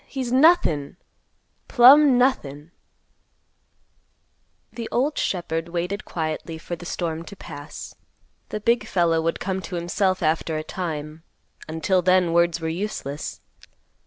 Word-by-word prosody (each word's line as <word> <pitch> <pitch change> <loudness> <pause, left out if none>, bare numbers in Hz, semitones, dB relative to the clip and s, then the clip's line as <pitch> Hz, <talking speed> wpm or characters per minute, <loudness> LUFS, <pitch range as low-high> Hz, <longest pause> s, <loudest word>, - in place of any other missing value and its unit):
He's 260 -3 -4
nothin'! 255 - +3 0.7
plumb 270 +1 +7
nothin'!" 160 - 0 2.0
The 230 -2 -6
old 280 +5 0
shepherd 170 -2 -2
waited 180 +4 -3
quietly 160 0 -4
for 175 +2 -6
the 175 +1 -10
storm 165 -3 -3
to 200 - -10
pass. 145 -5 -9 0.6
The 215 - -4
big 235 +3 +1
fellow 170 -3 +2
would 165 +1 -1
come 190 0 -3
to 185 - -7
himself 185 +2 0
after 160 0 0
a 155 - -3
time; 155 -3 -5 0.5
until 160 +4 0
then, 180 -1 +3
words 170 0 +2
were 165 - -4
useless. 160 -5 -4
175 Hz, 125 wpm, -23 LUFS, 160-205 Hz, 2.0 s, plumb